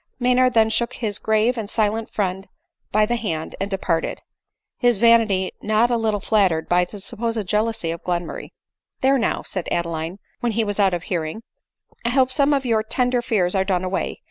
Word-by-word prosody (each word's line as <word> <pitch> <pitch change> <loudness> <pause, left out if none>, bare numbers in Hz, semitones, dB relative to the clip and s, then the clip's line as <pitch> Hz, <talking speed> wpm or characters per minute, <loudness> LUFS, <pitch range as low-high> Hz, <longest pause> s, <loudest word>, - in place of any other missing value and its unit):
Maynard 250 0 +3
then 220 -1 +4
shook 235 +2 0
his 215 -5 -3
grave 220 +3 +1
and 210 -2 -5
silent 220 0 0
friend 190 -1 -2 0.4
by 215 +1 +4
the 240 +2 -1
hand 165 -9 -4
and 195 - -1
departed 185 -4 -1 0.3
— - - -63
his 245 -4 +3
vanity 225 -4 +4
not 215 +3 +2
a - - +3
little 220 -2 0
flattered 190 -6 +1
by 180 0 +3
the 205 - -10
supposed 225 +2 -3
jealousy 210 -3 0
of 165 - -6
Glenmurray. 175 -1 -3 0.3
" - - -55
There 270 +1 +4
now," 230 - -1
said 185 -3 -4
Adeline, 170 +1 -2 0.2
when 240 -3 -1
he 225 +1 +1
was 205 -1 -3
out 195 -3 +3
of 175 - -5
hear 175 -4 -2
ing, 190 +9 -6 0.3
" - - -35
I 235 - 0
hope 260 0 +3
some 280 +1 +3
of 275 -2 +1
your 225 -3 +2
tender 245 +2 0
fears 210 -7 0
are 190 -1 +2
done 185 -2 0
away. 185 +1 -2
215 Hz, 205 wpm, -22 LUFS, 185-235 Hz, 0.4 s, then